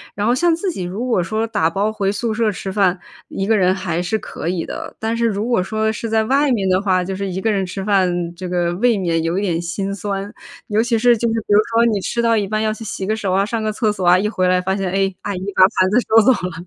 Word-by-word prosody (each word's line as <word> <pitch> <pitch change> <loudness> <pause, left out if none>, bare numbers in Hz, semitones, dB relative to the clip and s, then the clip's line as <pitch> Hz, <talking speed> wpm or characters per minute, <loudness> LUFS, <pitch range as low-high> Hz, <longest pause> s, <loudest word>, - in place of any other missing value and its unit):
然 205 +1 -1
后 240 - +3
像 340 +4 +2
自 340 +4 -2
己 295 - -4
如 195 +8 -4
果 230 -8 +1
说 215 +6 -2
打 205 -8 +1
包 195 +5 0
回 195 -2 0
宿 220 +2 -2
舍 220 -1 +1
吃 195 0 -6
饭， 190 -2 +1 0.3
一 195 - -3
个 220 - +3
人 185 -1 +3
还 185 -3 -2
是 200 +5 -1
可 170 - -5
以 180 -2 -2
的。 - - -7
但 225 +1 -1
是 235 0 0
如 215 0 -1
果 235 -7 +1
说 220 +3 -1
是 220 +1 -4
在 220 0 +1
外 275 +4 +2
面 200 -6 0
的 185 +1 +2
话， 185 -3 +1
就 190 +2 -4
是 200 +1 -3
一 185 - -3
个 220 +3 0
人 195 -2 0
吃 190 +2 -6
饭， 175 -4 +1
这 180 0 -6
个 175 -1 0
未 230 +5 +2
免 170 -4 0
有 165 +3 0
一 - - -2
点 175 -4 -1
心 195 +4 -3
酸。 200 0 -4 0.3
尤 215 +1 +1
其 235 -2 0
是 245 0 +5
就 235 +1 0
是 225 - -1
比 - - +2
如 205 - +7
说 230 +1 +4
你 215 -4 +1
吃 235 - -1
到 230 -1 +3
一 210 -2 +1
半 215 +2 -2
要 215 0 0
去 220 - -9
洗 200 -3 -5
个 215 - 0
手 200 -4 -2
啊， 195 +1 +2
上 225 +1 -3
个 215 - 0
厕 215 0 0
所 190 -3 -4
啊， 180 +1 +6
一 205 - 0
回 185 -4 0
来 185 - +3
发 190 +1 -1
现， 195 -2 -2
哎， 195 0 0
阿 205 - -3
姨 185 - -4 0.2
把 - - +6 0.2
盘 185 0 +4
子 210 - +2
收 225 +1 +7
走 260 - +6
了。 180 -6 -4
200 Hz, 315 characters per minute, -19 LUFS, 185-220 Hz, 0.3 s, 如